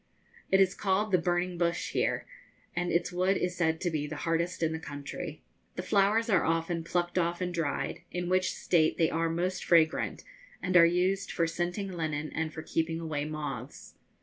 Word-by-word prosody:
It 190 Hz, -, +4 dB
is 190 Hz, -1 st, +4 dB
called 200 Hz, +2 st, 0 dB
the 185 Hz, -, +4 dB
'burning 175 Hz, +1 st, 0 dB
bush' 170 Hz, -1 st, 0 dB
here, -, -, 0 dB, 0.5 s
and 175 Hz, 0 st, 0 dB
its 170 Hz, +1 st, +1 dB
wood 185 Hz, +2 st, +2 dB
is 180 Hz, 0 st, -1 dB
said 160 Hz, -2 st, +1 dB
to 175 Hz, -, 0 dB
be 150 Hz, -2 st, -1 dB
the 155 Hz, -, -5 dB
hardest 170 Hz, +1 st, 0 dB
in 160 Hz, -, +2 dB
the 160 Hz, -, -3 dB
country. 145 Hz, -2 st, -7 dB, 0.3 s
The -, -, -4 dB
flowers 205 Hz, +4 st, +3 dB
are 190 Hz, -7 st, +3 dB
often 165 Hz, +1 st, 0 dB
plucked 175 Hz, +1 st, 0 dB
off 170 Hz, 0 st, 0 dB
and 180 Hz, -1 st, -2 dB
dried, 165 Hz, -4 st, -2 dB
in 175 Hz, 0 st, -3 dB
which 185 Hz, +1 st, +2 dB
state 160 Hz, -3 st, +2 dB
they 160 Hz, -, +3 dB
are 165 Hz, 0 st, +1 dB
most 180 Hz, +3 st, -1 dB
fragrant 165 Hz, -2 st, +3 dB, 0.4 s
and 185 Hz, -1 st, -2 dB
are 170 Hz, -1 st, +9 dB
used 185 Hz, +3 st, +1 dB
for 170 Hz, -, +1 dB
scenting 175 Hz, +4 st, -2 dB
linen 155 Hz, -3 st, -3 dB
and 160 Hz, -1 st, -2 dB
for 160 Hz, 0 st, -7 dB
keeping 165 Hz, +1 st, -1 dB
away 155 Hz, -3 st, -2 dB
moths. 145 Hz, -4 st, -6 dB
170 Hz, 190 wpm, -30 LUFS, 160-180 Hz, 0.5 s, are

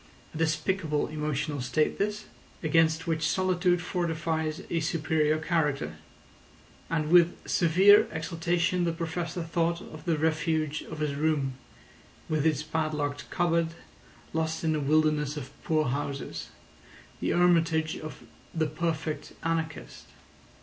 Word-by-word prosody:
A -, -, -6 dB
despicable 160 Hz, 0 st, 0 dB
emotional 150 Hz, -2 st, -2 dB
state 150 Hz, +5 st, 0 dB
this, 210 Hz, +1 st, -1 dB, 0.4 s
against 160 Hz, 0 st, +3 dB
which 160 Hz, -1 st, 0 dB
solitude 180 Hz, -1 st, +2 dB
fortifies 165 Hz, -3 st, -2 dB
a 170 Hz, -, +1 dB
superior 155 Hz, -1 st, +1 dB
character; 150 Hz, -, -1 dB, 0.9 s
and 155 Hz, -2 st, -1 dB
with 175 Hz, -1 st, +6 dB
severe 190 Hz, +5 st, +6 dB
exultation 170 Hz, +2 st, 0 dB
the 170 Hz, -, 0 dB
Professor 170 Hz, +1 st, -3 dB
thought 170 Hz, +1 st, 0 dB
of 155 Hz, -2 st, -11 dB
the 165 Hz, -3 st, +1 dB
refuge 155 Hz, -1 st, 0 dB
of 155 Hz, -1 st, -6 dB
his 150 Hz, -2 st, 0 dB
room, 145 Hz, -2 st, 0 dB, 0.7 s
with 155 Hz, -1 st, +1 dB
its 155 Hz, -2 st, +1 dB
padlocked 155 Hz, -2 st, -2 dB
cupboard, 170 Hz, -1 st, +1 dB, 0.6 s
lost 160 Hz, 0 st, -1 dB
in 160 Hz, -1 st, +2 dB
a -, -, 0 dB
wilderness 150 Hz, 0 st, +2 dB
of 130 Hz, -3 st, -6 dB
poor 155 Hz, -1 st, +2 dB
houses, 140 Hz, +1 st, -4 dB, 0.7 s
the -, -, -1 dB
hermitage 165 Hz, -2 st, +3 dB
of 155 Hz, -1 st, -8 dB, 0.3 s
the 160 Hz, -1 st, +2 dB
perfect 155 Hz, 0 st, -3 dB
anarchist. 165 Hz, -1 st, -3 dB
160 Hz, 120 wpm, -28 LUFS, 155-170 Hz, 0.9 s, with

